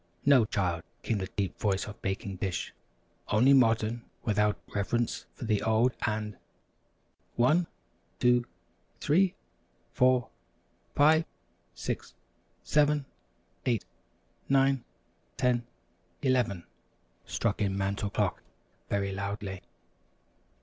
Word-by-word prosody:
"No, 135 -5 +6
child," 90 -5 -1 0.2
came 110 -3 0
the 95 - -3
deep 100 -1 -3
voice 100 -2 +1
of 105 0 -10
Baking 95 0 -3
Dish, 90 -1 -3 0.5
"only 125 +6 +5
modern 115 -2 +3 0.2
without 105 -3 +2 0.2
reverence 115 +4 -1
for - - -6
the 110 -2 +1
old 110 +3 +3
and 105 -2 -2 0.5
" - - -42
"One 170 +4 +3 0.5
two 125 0 +3 0.5
three 180 +4 +3 0.6
four 125 -1 +3 0.7
five 155 +3 +5 0.5
six - - -4 0.5
seven 150 0 +3 0.6
eight 115 -5 +1 0.6
nine 135 -2 +3 0.5
ten 120 -2 +1 0.6
eleven!" 125 -9 +1 0.6
struck 115 -2 -1
in 100 -1 +1
Mantel 100 +1 -1
Clock, - - -1 0.5
very 100 -1 0
loudly. 100 -1 -4
110 Hz, 100 wpm, -29 LUFS, 100-130 Hz, 0.7 s, No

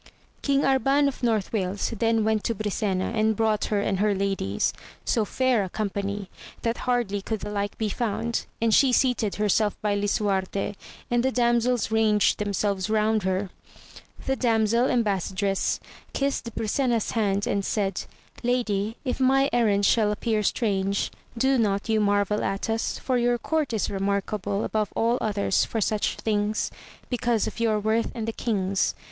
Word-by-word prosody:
King 280 -1 +2
Arban 270 +2 +3
of 275 - -4
North 225 -5 0
Wales 195 +1 -1
then 225 -1 +2
went 220 -1 +1
to 230 - 0
Brisena, 200 -2 -1
and 220 0 +2
brought 215 -1 +1
her 205 -2 0
and 195 -2 -1
her 205 0 +2
ladies, 195 - 0 0.3
so 225 -3 +1
fair 255 -2 +1
a 190 - -5
company, 200 0 -3 0.4
that 230 0 0
hardly 225 -5 0
could 220 +1 -3
the 210 - -5
like 205 0 -3
be 220 - -1
found, 230 +2 -2
and 230 -1 +2
she 270 +2 +5
seated 245 -5 +2
herself 210 0 +1
by 210 -1 +1
Lisuarte, 200 -1 0 0.4
and 240 0 +3
the 265 - +2
damsels 240 -2 +1
ranged 220 -2 +3
themselves 200 -1 -1
around 215 0 +2
her. 190 0 -1 0.7
The 265 - +1
damsel 230 0 +2
embas 205 -9 0
sadress 195 0 0 0.3
kissed 275 -5 -2
Brisena's 230 +1 0
hand 205 -3 +1
and 200 0 0
said. 195 -2 -1 0.4
Lady, 225 -3 0
if 255 - -2
my 270 +1 +3
errand 210 -4 +3
shall 210 0 +3
appear 215 0 0
strange, 200 -2 0 0.3
do 265 +2 +3
not 200 -1 0
you 220 -1 +3
marvel 205 0 +1
at 195 +3 -1
us, 225 0 -1
for 255 -2 0
your 240 0 +2
court 310 +2 -1
is 220 -3 0
remarkable 200 +1 -1
above 215 -2 -1
all 235 +2 +2
others 205 -3 +1
for 225 - -2
such 210 0 0
things, 210 0 -1 0.4
because 240 -2 +1
of - - -6
your 220 -2 +2
worth 220 +2 +1
and 225 -2 -4
the 225 - -2
king's. 195 -5 0
215 Hz, 165 wpm, -25 LUFS, 200-235 Hz, 0.7 s, she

